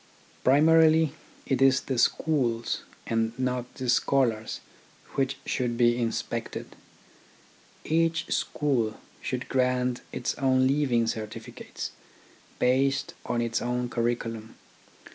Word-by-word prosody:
Primarily 160 +2 +5 0.3
it 135 -2 0
is 135 0 +5
the 130 -3 -2
schools 120 -6 +1 0.2
and 115 0 -1
not 125 -1 -2
the 130 - -4
scholars 120 -3 +1 0.5
which 135 0 0
should 120 -2 -1
be 120 -1 +4
inspected. 115 -2 -3 1.1
Each 165 +1 +1
school 125 -8 0 0.2
should 125 0 -3
grant 125 -1 +1
its 125 - -2
own 130 -1 +3
leaving 130 -4 +2
certificates, 110 -1 -6 0.7
based 135 +6 +2
on 120 -1 0
its 115 0 -1
own 125 0 -1
curriculum. 115 -2 -2
125 Hz, 105 wpm, -27 LUFS, 120-135 Hz, 1.1 s, Primarily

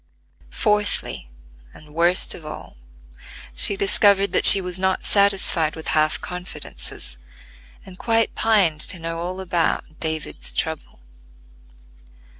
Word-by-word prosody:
Fourthly, 210 - -2 0.5
and 150 -1 -17
worst 170 +3 +3
of 165 - -10
all, 155 - -10 0.8
she 195 - +1
discovered 200 0 +3
that - - +2
she 200 - +11
was 180 -1 -6
not 190 0 -1
satisfied 195 -6 +1
with 160 - -7
half 155 0 +1
confidences, 180 - -7 0.7
and 185 -1 -14
quite 225 -1 0
pined 195 -9 +1
to 185 - -3
know 165 0 -6
all 180 +2 -5
about 170 -3 -2
"David's 160 -1 -2
trouble." 160 - -5
180 Hz, 115 wpm, -21 LUFS, 160-195 Hz, 0.8 s, she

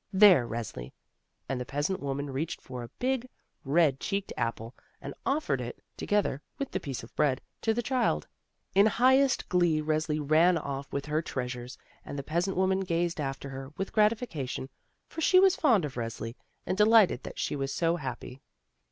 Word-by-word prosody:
There, 190 - +7
Resli!" 110 - -6 0.5
and 130 -2 -2
the - - -1
peasant 145 +9 -2
woman 140 0 -3
reached 150 +5 -3
for 125 -1 -8
a 120 - -6
big 255 0 -1 0.3
red 145 -1 +3
cheeked 200 0 -3
apple, 115 0 -3 0.3
and - - -7
offered 270 - 0
it, 120 0 -6 0.2
together 205 -9 0 0.2
with 275 - -4
the - - -1
piece 135 -5 -5
of 115 - -13
bread, 140 -4 +2 0.2
to 225 - +2
the 240 +2 -1
child. 240 - 0 0.5
In 200 +2 +6
highest 260 +4 +3
glee 175 -3 +2
Resli 155 0 0
ran 160 +4 +4
off 140 -2 -5
with 140 - -3
her 150 +1 0
treas 125 -5 -3
ures, 125 +1 -9 0.3
and 145 - -7
the 140 - -4
peasant 175 +6 -1
woman 190 0 +2
gazed 175 -3 -1
after 135 0 -4
her 135 +1 -8
with 195 - -4
gratification, 210 - 0 0.4
for 325 - -7
she 370 +3 +6
was 385 0 +5
fond 235 - +3
of 140 - -6
Resli 115 -1 -4 0.3
and 190 - -2
de 210 - +7
lighted 215 - +5
that - - -9
she - - -1
was 135 -1 -2
so 165 +2 +1
happy. 130 -2 -7
155 Hz, 185 wpm, -29 LUFS, 135-200 Hz, 0.5 s, There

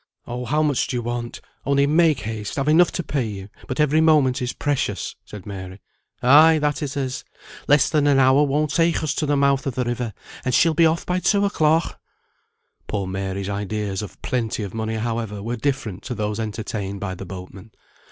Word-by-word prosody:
"Oh, 125 +1 -5
how 150 +5 +1
much 145 -4 +1
do - - -3
you 120 - -3
want? 120 0 -4 0.2
Only 140 0 +2
make 155 -1 +3
haste 110 +1 -5
I've 135 +1 -1
enough 165 +3 +5
to 175 - -2
pay 140 -5 -1
you, 100 -1 -7 0.2
but 130 - -4
every 150 +1 +3
moment 150 -6 +3
is 125 0 -1
precious," 130 -9 -2
said 105 -4 -10
Mary. 95 -1 -8 0.4
"Ay, 155 +5 +7
that 150 +1 -1
it 145 0 -4
is. 130 -2 -3 0.4
Less 145 +1 +5
than 150 -2 +2
an 140 -1 +4
hour 135 +1 +5
won't 150 +1 +1
take 165 +1 +2
us 150 -3 0
to 150 - -2
the 145 0 +2
mouth 140 0 +2
of 130 - -3
the 125 - 0
river, 120 -2 -3 0.3
and 130 -2 0
she'll 165 -1 +4
be 165 +1 +5
off 160 +1 -1
by 180 0 0
two 200 +2 +2
o'clock!" 160 -4 +1 0.9
Poor 100 -2 -2
Mary's 95 +1 -4
ideas 100 0 -3
of 105 - -9
"plenty 115 -4 -2
of 100 - -6
money," 110 0 -3
however, 110 -2 -3
were 120 +2 -2
different 115 -6 -2
to 125 -2 -4
those 105 0 -2
entertained 105 -2 -4
by 95 -2 -4
the 95 0 -8
boatmen. 95 +3 -9
125 Hz, 200 wpm, -22 LUFS, 105-150 Hz, 0.9 s, Ay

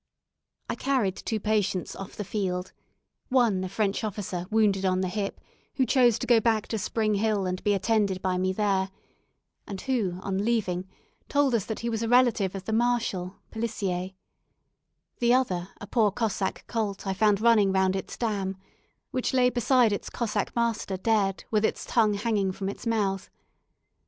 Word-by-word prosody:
I - - -2
carried 250 -9 0
two 220 - -3
patients 205 -3 0
off 195 - -8
the 210 - -4
field; 185 -2 -2 0.6
one 235 -8 +3
a 185 - -3
French 200 +2 -1
officer 185 -4 -4
wounded 210 -3 +2
on 185 -1 +2
the 185 - 0
hip, 195 +2 -3 0.4
who 260 - +2
chose 245 -4 +4
to - - -4
go 240 -2 +5
back 220 -1 +1
to 220 - -1
Spring 215 +1 0
Hill 205 -1 +1
and 185 0 -3
be 205 -1 +3
attended 200 -1 +1
by 185 -1 -1
me 185 0 +1
there, 195 -1 +1 0.8
and 195 -2 -5
who, 215 -9 -1
on 195 0 -1
leaving, 190 -6 0 0.4
told 285 -3 +2
us 225 -5 +1
that 220 - -4
he 235 - -1
was 225 -1 -2
a 230 - -1
relative 235 -6 +3
of 190 -1 -6
the 220 - -2
Marshal 220 -6 0 0.2
(Pelissier); 195 -5 -3 1.0
the 240 +1 +4
other, 185 -9 0
a - - -7
poor 215 0 +2
Cossack 205 -2 -2
colt 215 -4 -3
I 195 - 0
found 205 0 +3
running 215 -3 +4
round 190 0 +2
its 190 - -5
dam, 200 -5 -2 0.5
which 255 0 -1
lay 250 -1 +4
beside 245 -2 +3
its 205 - -4
Cossack 215 -3 -2
master 230 -5 0
dead, 195 -1 +1
with 215 -1 +2
its - - 0
tongue 215 -3 +2
hanging 205 -2 0
from 195 +1 -4
its 205 - -7
mouth. 200 -4 0
210 Hz, 175 wpm, -27 LUFS, 190-230 Hz, 1.0 s, go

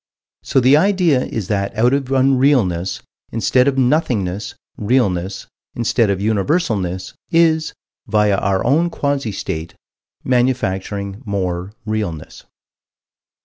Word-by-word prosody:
So - - +1
the 130 +3 +5
idea 175 -6 +2
is 110 -5 -4
that 100 -1 -2
out 120 +4 +3
of 140 -1 0
Unrealness, 130 -9 +2 0.3
instead 125 +3 +2
of 135 -1 +1
Nothingness, 120 - 0 0.2
Realness, 100 -5 0 0.3
instead 115 -1 +1
of 100 - +1
Universalness, 100 - -1 0.2
is, 160 -1 +2 0.3
via 105 -2 +2
our 95 -1 0
own 160 +8 +3
quasi 140 -7 -2
state, 85 -3 -5 0.5
manufacturing 100 -5 -1
more 95 -2 -3
Realness. 105 -8 -4
110 Hz, 105 wpm, -18 LUFS, 95-135 Hz, 0.5 s, the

